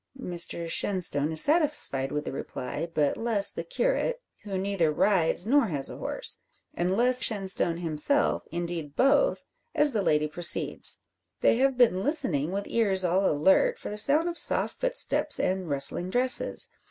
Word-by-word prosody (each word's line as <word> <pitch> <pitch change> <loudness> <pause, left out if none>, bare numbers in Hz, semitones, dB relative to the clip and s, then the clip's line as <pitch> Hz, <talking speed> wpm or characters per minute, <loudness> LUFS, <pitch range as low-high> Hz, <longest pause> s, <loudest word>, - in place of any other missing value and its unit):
Mr 170 -5 -3
Shenstone 165 -5 +2
is 160 - +5
satisfied 295 - +1
with 150 0 -4
the - - -5
reply; 135 +4 -7
but 150 -3 -1
less 225 -4 +2
the - - -6
curate, - - -2 0.2
who 195 -2 -6
neither 190 -4 -1
rides 175 +1 +2
nor 270 +2 +2
has 145 -7 -1
a - - -10
horse. - - -3 0.3
And 180 +3 -2
less 250 +2 +4
Shenstone 190 -5 +2
himself 170 - -1
indeed 170 -4 -6
both 275 - +1 0.3
as 295 -2 +3
the 215 - -1
lady 150 -4 0
proceeds. 170 +3 +1 0.4
They - - +2
have 265 0 0
been 210 -7 +2
listening, 170 - 0
with 200 +1 -4
ears 195 -5 0
all 185 +3 +1
alert, 190 - +1
for - - -9
the - - -6
sound 300 +9 +3
of 345 -1 -4
soft - - -2
footsteps - - -1
and 185 -2 -3
rustling 140 +6 +3
dresses. 250 +5 +2
190 Hz, 160 wpm, -26 LUFS, 165-255 Hz, 0.4 s, is